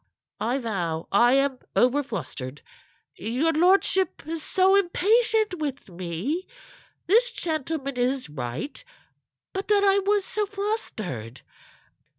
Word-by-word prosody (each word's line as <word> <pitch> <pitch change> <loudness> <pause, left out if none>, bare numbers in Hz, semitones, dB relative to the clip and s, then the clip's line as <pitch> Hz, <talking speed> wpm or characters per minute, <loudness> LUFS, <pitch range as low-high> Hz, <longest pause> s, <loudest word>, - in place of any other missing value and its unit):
"I 240 +4 0
vow 175 -10 -2
I 240 +5 +5
am 275 -1 +2 0.2
over 255 +4 +4
flustered. 140 - -6 0.5
Your 255 +10 0
lordship 370 +1 +2
is 325 +1 -4
so 375 +4 +3
impatient 420 +1 +2
with 285 -7 -4
me. 185 - -3 0.6
This 465 +7 +4
gentleman 310 - -3
is 250 -1 0
right. 135 - -5 0.7
But 385 0 -3
that 410 -1 +4
I 395 0 +5
was 400 0 +1
so 420 -1 -2
flustered. 215 - -4
295 Hz, 115 wpm, -25 LUFS, -, 0.7 s, I